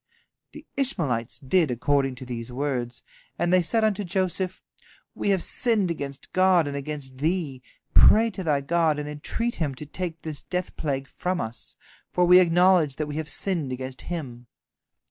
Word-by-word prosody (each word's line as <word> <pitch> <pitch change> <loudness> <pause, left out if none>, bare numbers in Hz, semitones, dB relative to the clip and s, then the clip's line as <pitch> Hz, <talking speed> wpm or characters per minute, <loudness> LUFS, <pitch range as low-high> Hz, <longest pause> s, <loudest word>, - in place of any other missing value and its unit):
The - - -11
Ishmaelites 145 - 0
did 155 +3 +2
according 135 +2 +1
to 130 - -9
these 120 -1 -6
words, 125 -2 -3 0.3
and 175 +1 +1
they 185 - +6
said 225 +6 +2
unto 210 -1 +1
Joseph: 185 0 -2 0.5
"We - - -2
have 190 -3 +2
sinned 220 -7 +2
against 140 -4 -6
God 185 -4 +4
and 140 - -4
against 140 -2 -5
thee. 155 -4 -1 0.3
Pray 225 +1 +6
to 190 -1 -6
thy 150 -4 +1
God, 160 +1 +1
and 150 0 -4
entreat 190 +11 -3
Him 145 -5 -2
to 150 - -8
take 165 +1 -5
this 155 -3 -4
death 180 0 -4
plague 135 -3 -2
from 180 +4 -3
us, 110 -3 -5 0.3
for 180 - +2
we 180 +1 +8
acknowledge 175 -4 +4
that 155 - -2
we 150 0 -5
have 155 -1 -4
sinned 160 -3 0
against 130 0 -5
Him." 125 -8 -6
155 Hz, 170 wpm, -25 LUFS, 135-185 Hz, 0.5 s, we